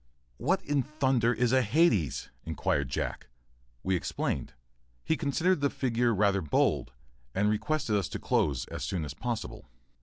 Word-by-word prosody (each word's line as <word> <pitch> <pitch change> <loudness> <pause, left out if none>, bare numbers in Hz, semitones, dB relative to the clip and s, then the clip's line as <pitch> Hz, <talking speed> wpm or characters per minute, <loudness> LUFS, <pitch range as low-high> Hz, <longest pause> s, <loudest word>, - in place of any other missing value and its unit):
["What 185 +10 +1
in 145 -1 +1
thunder 130 -5 +1
is 125 -1 +1
hades?" 125 - +2
inquired 70 -3 -1
Jack. - - -3 0.6
We 95 - +1
explained. 85 - -2 0.5
He 160 - +2
considered 165 +3 +1
the 140 - +3
figure 120 -3 +1
rather 100 -2 +2
bold, 70 -4 +1 0.4
and 105 +2 +3
requested 115 +2 0
us 100 -4 0
to - - -4
close 70 -5 +1
as - - -5
soon 80 +3 -2
as 70 - -6
possible. 110 +8 -5
115 Hz, 145 wpm, -29 LUFS, 95-140 Hz, 0.6 s, the